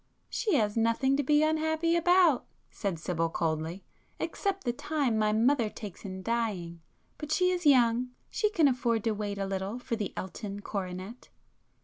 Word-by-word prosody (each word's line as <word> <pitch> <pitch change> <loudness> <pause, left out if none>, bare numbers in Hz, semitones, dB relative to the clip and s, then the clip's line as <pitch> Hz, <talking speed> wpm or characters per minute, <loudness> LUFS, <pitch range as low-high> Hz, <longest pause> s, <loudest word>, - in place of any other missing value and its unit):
"She 425 -8 +1
has 210 -5 +1
nothing 230 +4 +2
to - - +2
be 295 +2 +3
unhappy 315 +2 +1
about—" 345 -4 +4 0.2
said 195 -5 -3
Sibyl 165 0 -1
coldly—"except 170 - -3
the 240 - 0
time 280 -2 -1
my 215 -1 +2
mother 230 +1 +3
takes 210 -4 -9
in 190 -1 -6
dying. 195 -8 -2 0.4
But 300 0 -6
she 365 +3 +3
is 355 -3 0
young; 245 -2 +4 0.2
she 425 - +1
can 335 -8 +4
afford 240 -4 +1
to 225 - +1
wait 205 -1 -3
a 195 - -1
little 195 +3 -3
for 245 -1 -3
the 210 -4 -3
Elton 200 +1 -6
coronet." 190 +3 -6
230 Hz, 160 wpm, -29 LUFS, 200-295 Hz, 0.4 s, about